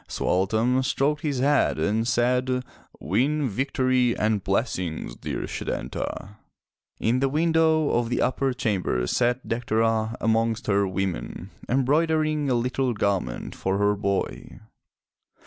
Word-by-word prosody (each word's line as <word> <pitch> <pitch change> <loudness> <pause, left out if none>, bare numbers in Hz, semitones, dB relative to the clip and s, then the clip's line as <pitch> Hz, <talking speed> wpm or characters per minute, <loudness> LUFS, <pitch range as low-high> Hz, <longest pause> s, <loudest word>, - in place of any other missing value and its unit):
Sualtam 110 +7 +1
stroked 145 +3 0
his 145 -4 -1
head 145 +1 +3
and 110 +3 0
said, 125 +1 +1 0.4
"Win 135 - +1
victory 130 +1 +1
and 105 -2 0
blessings, 95 - -2
dear - - -4
Setanta!'' 100 +2 -5 0.6
In 120 +3 +1
the 135 +1 +1
window 160 0 +2
of 120 -1 +1
the 120 - 0
upper 135 +1 +1
chamber 100 - -1
sat 125 - 0
Dectera 115 -1 0
amongst 115 0 +1
her 100 -1 +2
women, 95 -8 -4 0.2
embroidering 155 +3 +1
a 125 - +2
little 125 +1 0
garment 100 - -2
for 95 +1 -1
her 105 0 +3
boy. 100 -1 -3
120 Hz, 120 wpm, -25 LUFS, 105-135 Hz, 0.6 s, head